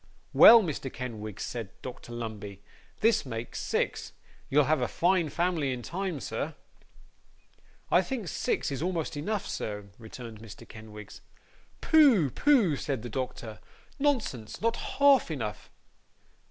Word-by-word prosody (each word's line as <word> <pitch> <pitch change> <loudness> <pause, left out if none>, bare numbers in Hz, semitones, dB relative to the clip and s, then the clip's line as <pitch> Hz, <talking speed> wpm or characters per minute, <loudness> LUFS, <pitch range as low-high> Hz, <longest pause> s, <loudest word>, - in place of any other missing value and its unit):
'Well, 230 -1 +9
Mr. 145 -6 -4
Kenwigs,' 110 -5 -6
said 110 -5 -7
Dr 125 -1 -8
Lumbey, 105 -4 -6 0.4
'this 225 +1 +3
makes 115 -3 -6
six. - - -2 0.4
You'll 150 +2 +4
have 155 +2 +1
a - - +1
fine 175 -2 +1
family 170 -3 0
in 125 -1 -5
time, 185 -1 -3
sir.' 140 +6 -4 1.4
'I - - +6
think 245 -8 -4
six 150 - -1
is 135 - -4
almost 170 -3 -2
enough, 200 +8 -2
sir,' 105 -1 -5
returned 115 -1 -10
Mr. 110 -3 -12
Kenwigs. 105 -2 -11 0.6
'Pooh! 260 - +5
pooh!' 235 - +3
said 135 -6 -3
the 120 - -6
doctor. 115 -3 -5 0.4
'Nonsense! 245 - -1
not 230 +1 +1 0.2
half 280 -6 +5
enough. 115 - -5
135 Hz, 130 wpm, -28 LUFS, 115-185 Hz, 1.4 s, Well